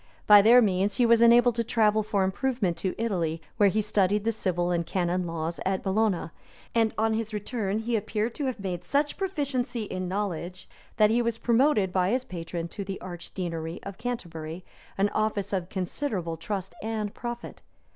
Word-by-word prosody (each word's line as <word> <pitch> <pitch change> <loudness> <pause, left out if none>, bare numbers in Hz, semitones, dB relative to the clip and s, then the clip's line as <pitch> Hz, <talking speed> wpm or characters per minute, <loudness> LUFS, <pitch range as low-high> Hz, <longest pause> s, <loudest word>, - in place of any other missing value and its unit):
By 205 -1 +9
their 240 +4 +7
means 195 0 +1
he 245 - +3
was 230 0 +5
enabled 240 +1 +6
to 230 0 0
travel 220 -2 +2
for 205 -2 0
improvement 200 -1 0
to 190 - -2
Italy, 175 -8 -1 0.2
where 205 -2 +5
he 215 +2 0
studied 205 0 +2
the 230 - +1
civil 180 -5 -1
and 170 -1 +1
canon 180 0 -1
law 165 0 -2
at 190 0 -1
Bologna; 195 -4 0 0.4
and 225 -2 +3
on 220 0 +2
his 220 -1 -2
return 210 -1 -2
he 230 +2 -1
appeared 220 +2 -1
to 285 - -3
have 255 -4 -3
made 180 -3 -4
such 285 +9 0
proficiency 275 - -2
in 185 -3 -4
knowledge, 180 -2 -4 0.3
that 215 0 +5
he 240 +2 +3
was 235 -1 -1
promoted 230 -6 +2
by 185 -1 +2
his 250 +4 +1
patron 170 -4 -5
to 200 - -5
the 195 0 -5
archdeaconry 175 -2 -5
of 200 -1 -8
Canterbury, 175 -8 -5 0.3
an 200 +1 +2
office 210 -2 -1
of 185 -2 -1
considerable 185 - -3
trust 190 +3 -4
and 215 -2 -3
profit. 240 0 -7
205 Hz, 180 wpm, -27 LUFS, 180-230 Hz, 0.4 s, By